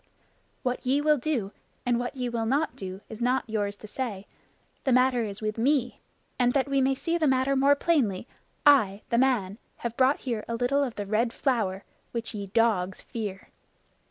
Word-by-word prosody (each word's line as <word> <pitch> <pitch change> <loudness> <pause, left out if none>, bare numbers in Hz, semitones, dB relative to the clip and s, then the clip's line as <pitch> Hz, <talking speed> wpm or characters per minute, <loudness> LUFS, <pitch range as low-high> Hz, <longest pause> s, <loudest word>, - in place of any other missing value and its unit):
What 250 -1 -1
ye 265 +3 +2
will 300 -1 +3
do, 240 -8 -1 0.3
and 240 -1 +2
what 245 +3 -3
ye 250 -2 -2
will 230 -2 -2
not 285 +6 +1
do, 190 0 -7
is 220 +1 -9
not 250 +2 +1
yours 205 -2 -1
to 215 - -12
say. 210 -4 -4 0.6
That 260 -3 +3
matter 255 -1 +3
is 215 -1 -5
with 215 +1 -2
me; 255 0 +1 0.4
and 245 0 +3
that 275 -1 +2
we 275 -1 +2
may 265 +1 +2
see 335 +5 -1
the 310 - +2
matter 265 +1 +2
more 275 +2 +5
plainly, 260 - +1 0.4
I, 220 -9 +5
the 235 - +3
man, 230 -6 +1 0.2
have 235 -1 -5
brought 265 +3 +3
here 230 -5 -3
a 230 - -2
little 250 +4 +1
of 250 -5 -3
the 205 - -4
Red 220 +4 +1
Flower 215 -8 -1 0.3
which 235 0 -4
ye, 200 -2 -5
dogs, 195 -3 +1
fear." 205 -4 -6
240 Hz, 190 wpm, -27 LUFS, 215-265 Hz, 0.6 s, more